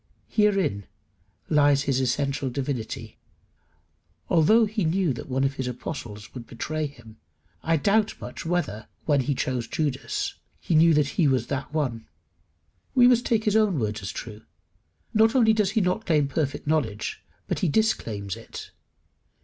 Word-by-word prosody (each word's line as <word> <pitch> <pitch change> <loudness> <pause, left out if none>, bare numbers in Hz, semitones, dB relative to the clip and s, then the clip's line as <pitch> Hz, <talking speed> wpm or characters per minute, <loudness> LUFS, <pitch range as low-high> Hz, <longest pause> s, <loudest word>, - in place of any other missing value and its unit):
Herein 195 - +1 0.6
lies 145 -2 +4
his 135 -2 +1
essential 140 +1 0
divinity. 130 -3 -4 1.1
Although 215 +8 +5
he 215 -1 -2
knew 170 -2 +1
that 120 - -8
one 130 +1 0
of 135 0 +1
his 130 -2 -4
apostles 120 -4 -6
should 120 +2 -10
betray 155 +6 -3
him, 115 -5 -15 0.4
I 165 0 +2
doubt 205 +7 +1
much - - -7
whether, 165 - -2 0.2
when 145 -3 +3
he 140 +2 -1
chose 125 -2 -2
Judas, 135 -6 -2 0.3
he - - -2
knew 160 0 +6
that 150 -1 +2
he 155 - +5
was 130 -2 +2
that 140 -1 -3
one. 130 -8 -2 0.9
We 245 -1 +7
must 245 -1 +3
take 225 -2 +2
his 210 -1 +1
own 215 -6 +3
words 110 -4 -2
as 95 - -5
true. 110 -2 -8 0.7
Not 220 +3 +4
only 225 -4 +5
does 210 -3 +2
he - - +5
not 185 +4 -1
claim 150 -5 +3
perfect 140 0 -2
knowledge, 135 -9 -1 0.3
but - - -1
he 185 - +1
disclaims 110 - 0
it. - - -10
145 Hz, 155 wpm, -25 LUFS, 125-185 Hz, 1.1 s, We